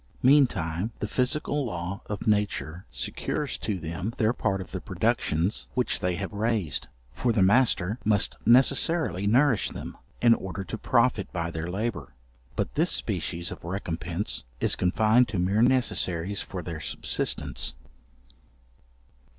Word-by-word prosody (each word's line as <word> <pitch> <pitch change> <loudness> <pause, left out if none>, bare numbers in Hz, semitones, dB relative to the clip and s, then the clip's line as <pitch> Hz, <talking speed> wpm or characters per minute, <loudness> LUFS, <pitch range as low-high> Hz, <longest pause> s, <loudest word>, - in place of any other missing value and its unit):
Meantime, 110 - +3
the 105 - -3
physical 140 +5 +1
law 90 -3 -4
of 105 -2 -5
nature 100 -4 -1
secures 150 -3 -3
to 105 -3 -3
them 85 +6 -4
their 110 +1 +2
part 95 -5 -1
of 95 - -8
the - - -4
productions 85 +8 0
which 125 -1 0
they 90 -1 0
have 100 +2 -5
raised; 105 - -1 0.3
for 120 - 0
the 105 -4 +3
master 110 -1 +3
must 105 -2 +2
necessarily 130 - +4
nourish 125 0 +3
them, - - -7 0.2
in 120 -1 +6
order 95 -3 -4
to 105 - -5
profit 115 -2 +1
by 85 -2 -3
their 80 0 -4
labour. 100 - -4 0.4
But - - -2
this - - +2
species 85 +1 0
of - - -9
recompence 85 - -3 0.2
is - - +2
confined 110 +6 +3
to 100 - -4
mere 95 +5 +2
necessaries 100 -7 +1
for 90 -3 -6
their 85 -1 -5
subsistence. 65 - -1
100 Hz, 140 wpm, -27 LUFS, 90-120 Hz, 0.4 s, in